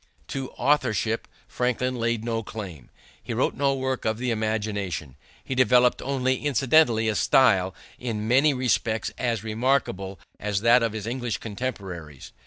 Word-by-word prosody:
To 135 -2 -4
authorship 120 -5 +1 0.2
Franklin 125 +1 -1
laid 115 -1 -1
no 115 -1 -1
claim. 95 - -8 0.3
He - - -5
wrote - - +1
no 140 0 +1
work 130 -1 -2
of 110 0 0
the 125 +1 -1
imagination. 105 - -2 0.3
He - - -4
developed 125 -1 +4
only 130 -1 -1
incidentally 135 -4 +3
a 110 - +2
style 95 -7 +3 0.2
in 110 -3 -3
many 135 +6 +5
respects 120 -4 0
as 115 -4 -1
remarkable 110 -5 -1 0.2
as 105 -1 -1
that 120 +2 +5
of 115 -2 0
his 110 -2 -5
English 120 0 -2
contemporaries. 95 - -6
115 Hz, 145 wpm, -25 LUFS, 105-130 Hz, 0.3 s, many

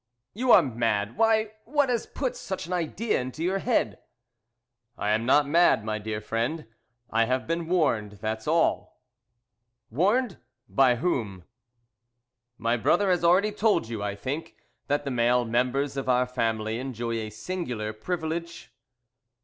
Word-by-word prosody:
"You 245 +4 +1
are - - +8
mad! 115 -4 -1
Why, 220 -1 +2
what 285 +1 +1
has 240 -2 -1
put 260 -3 -3
such 190 -2 -5
an 180 - -5
idea 180 - -1
into 130 +6 -5
your 190 +3 0
head?" 235 +3 0 1.0
"I 105 - -1
am 110 +2 0
not 145 +2 +4
mad, 160 -8 +4
my 110 0 -2
dear 105 0 -4
friend. 115 +9 -2 0.5
I 115 +1 +3
have 130 +2 -1
been 165 0 -2
warned 140 - +1
that's 110 +2 -4
all." 165 +2 +1 0.9
"Warned! 200 - +1 0.3
By 130 -2 +4
whom?" 115 - -2 1.1
"My 115 +1 0
brother 185 - +2
has 175 -1 +1
already 185 +5 +4
told 205 - +1
you, 115 -3 -4
I 100 -1 -2
think, 145 +10 -5 0.3
that 145 +1 0
the 140 - -3
male 120 0 +2
members 125 +4 0
of 135 -1 -3
our 125 0 +3
family 115 -3 -2
enjoy 120 -3 -3
a 110 -1 -4
singular 110 - -4
privilege?" 170 +6 -4
130 Hz, 150 wpm, -26 LUFS, 115-175 Hz, 1.1 s, are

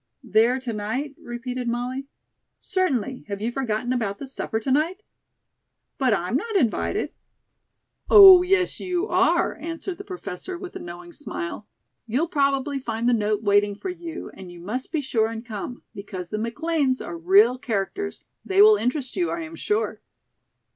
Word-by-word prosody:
"There 230 +4 +3
to 245 -3 -4
night?" 225 +8 -3
repeated 245 +1 -5
Molly. 250 +3 -3 0.5
"Certainly. 265 - -1
Have 200 -1 -4
you 225 +3 -2
forgotten 245 -1 -1
about 210 -5 -2
the 275 - -7
supper 225 -4 -2
to 245 +4 -3
night?" 335 +9 +1 1.0
"But 260 -3 +3
I'm 190 +2 0
not 440 - -2
invited." 245 - 0 1.0
"Oh, 385 -3 +11
yes, 365 0 +1
you 365 +1 -1
are," - - +2
answered 330 +4 -6
the - - -6
Professor, 370 - -6
with 365 0 -9
a - - -5
knowing 175 0 -9
smile. 170 +5 -6 0.4
"You'll 275 +9 0
probably 280 -3 +1
find 230 -2 -2
the 245 - +4
note 210 -1 0
waiting 205 0 +3
for 370 - -5
you. 345 -2 -7
And 185 -2 -10
you 175 - -12
must 215 +9 -5
be 315 - 0
sure 225 -5 +1
and 225 +1 -7
come, 230 +2 -6
because 185 -3 -7
the 215 - -2
McLean's 260 +3 0
are 175 - -6
real 200 +9 +4
characters. 255 - -3 0.2
They 385 0 0
will 425 0 +7
interest 255 - -2
you, 350 -2 0
I 340 - -3
am 325 0 -7
sure." 420 +5 -1
255 Hz, 165 wpm, -24 LUFS, 215-330 Hz, 1.0 s, Oh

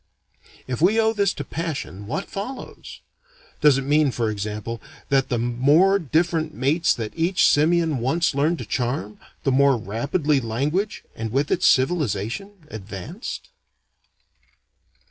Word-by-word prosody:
If 130 +2 -4
we 205 +6 +4
owe 220 0 +3
this 200 -3 +2
to 145 - -4
passion, 135 - -5
what 155 - -3
follows? 250 +7 -7 0.6
Does 145 -3 +6
it 135 - -2
mean, 145 +1 +3
for 115 -3 -1
example, 105 +2 -5 0.3
that 135 -2 +2
the 120 - 0
more 140 +12 +3
different 160 0 0
mates 150 +7 +2
that 110 -2 -5
each 175 +4 +2
simian 160 -1 +3
once 155 +8 +1
learned 150 +5 +1
to - - -6
charm, 120 -5 -3 0.2
the 135 - +2
more 135 0 +4
rapidly 140 - 0
language, 140 - -2
and 110 -1 -4
with 140 +4 0
it - - +1
civilization, 150 - 0
advanced? 110 - -7
140 Hz, 135 wpm, -23 LUFS, 120-170 Hz, 0.6 s, Does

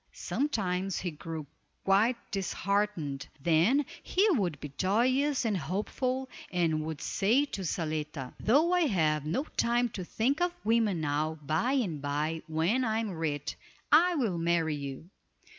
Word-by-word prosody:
Sometimes 195 -9 -1
he 175 - -2
grew 160 0 -6 0.4
quite 210 +6 +3
disheartened, 195 -7 -1
then 175 - +3 0.2
he 390 +4 +2
would 185 - 0
be 145 -2 -8
joyous 255 +8 +2
and 215 -3 +1
hopeful, 215 - -2 0.2
and 165 -4 +1
would 155 -2 -5
say 235 +9 +2
to 205 - -6
Zaletta: 155 -5 -3
"Though 305 +10 +3
I 355 -3 +4
have 155 - +1
no 175 - 0
time 240 +1 +2
to 195 -4 -6
think 260 - 0
of 355 0 +1
women 220 -6 +2
now, 155 +2 -1
by 160 - +1
and 190 - 0
by, 150 +3 -1
when 165 +11 +1
I 220 -2 0
am 225 -2 -1
rich, 155 -4 -3 0.4
I 345 +4 +6
will 220 - 0
marry 165 -2 +1
you." 140 +2 -6
185 Hz, 145 wpm, -30 LUFS, 155-245 Hz, 0.4 s, I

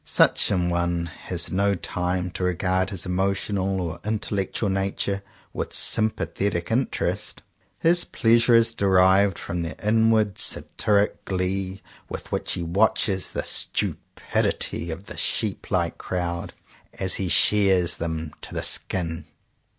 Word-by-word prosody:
Such - - +3
an 90 -3 +1
one 85 0 0
has 85 +1 -3
no 100 +2 +2
time 90 0 -2
to 90 - -4
regard 90 +1 0
his 95 -4 -4
emotional 95 +1 -1
or 85 -2 -4
intellectual 105 -1 -2
nature 100 +1 -1 0.3
with - - -4
"sym 110 0 +3
pathetic 100 -3 -3
interest." 125 +3 -1 0.4
His 170 +1 +5
pleasure 115 0 +3
is 115 0 +4
derived 95 -1 +4
from 85 0 -4
the 85 -1 -5
inward 110 -1 +2
satiric 105 -1 0
glee 95 +1 -2 0.3
with - - -7
which - - -1
he 85 - -3
watches 95 +1 +1
the - - -2
stupidity 85 - 0
of 90 +5 -6
the - - -8
sheep - - -1
like - - 0
crowd, 85 -1 -3 0.4
as 95 -1 -2
he 95 - -1
shears 95 -3 +4
them 80 -2 -4
to - - -8
the - - -2
skin. 80 -3 0
95 Hz, 135 wpm, -24 LUFS, 90-100 Hz, 0.4 s, His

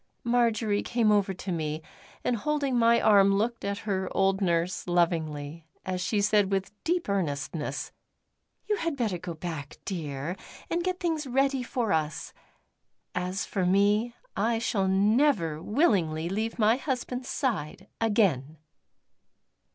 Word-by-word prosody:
Marjory 230 -3 +2
came 230 -3 +2
over 205 -1 +3
to 185 0 -5
me, 155 -2 -2 0.4
and 245 - +1
holding 285 +1 0
my 235 0 +5
arm 200 -2 +5
looked 230 +4 -1
at 200 0 -2
her 190 -3 -1
old 195 +1 +2
nurse 175 0 0
lovingly 160 -3 -1 0.2
as 185 -1 -2
she 205 +4 +1
said 205 -1 +3
with 195 0 -1
deep 345 +1 0
earnestness: 150 -6 -2 0.7
"You 420 - 0
had 330 -6 -2
better 215 -8 -1
go 170 -1 -6
back, 155 -4 -6
dear, 155 -1 -4 0.3
and 345 +1 0
get 365 0 -1
things 320 -5 -1
ready 270 +1 +1
for 240 -3 -1
us. 155 -1 -2 0.8
As 180 +2 -2
for 190 - -2
me, 205 +5 +2 0.2
I 230 0 +1
shall 210 -4 0
never 195 - +2
willingly 175 - +1
leave 220 +4 -2
my 220 +1 +4
husband's 255 -2 -3
side 190 - -2
again!" 185 - +2
200 Hz, 135 wpm, -28 LUFS, 170-235 Hz, 0.8 s, my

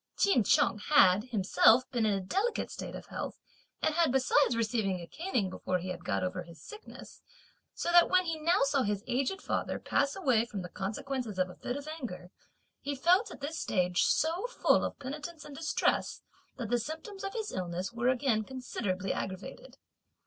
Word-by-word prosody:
Ch'in 390 - +4
Chung 210 - +3
had 205 -6 +5
himself 230 +1 +4
ever - - -37
been 235 -4 +1
in 200 -2 +2
a - - -3
delicate 420 - -1
state - - -6
of - - -8
health - - -6 0.4
and 315 - +2
had 330 -3 +3
besides 265 0 +3
received 225 -2 0
a 170 - -7
caning 285 - -2
before 185 0 -2
he 180 +1 -6
had 180 - -6
got - - -1
over 185 0 -2
his 170 -2 -12
sickness, 430 - -12 0.5
so 345 - -1
that 345 0 +7
when 370 0 +4
he 325 -2 -2
now 335 +1 +2
saw 275 0 +2
his 205 -3 -1
aged 275 +10 -1
father - - -1
pass 280 0 0
away 260 - +2
from 210 -5 -6
the 180 - -7
consequences 220 +3 -4
of 185 0 0
a - - -13
fit 250 - -4
of 285 +1 -8
anger, 245 - -7 0.5
he 285 0 -3
felt, 365 - +3
at - - -11
this 315 +3 -4
stage, 180 -1 +1
so 335 +8 +1
full - - +2
of - - -3
penitence 295 +4 -7
and 290 - -10
distress 315 +1 0 0.3
that 235 -4 -5
the 240 - +3
symptoms 320 - -7
of 390 - -4
his 440 -3 -3
illness 180 +3 -4
were 240 +2 +1
again 255 -4 +2
considerably 205 -7 -3
aggravated. 195 - -6
255 Hz, 190 wpm, -31 LUFS, 200-315 Hz, 0.5 s, that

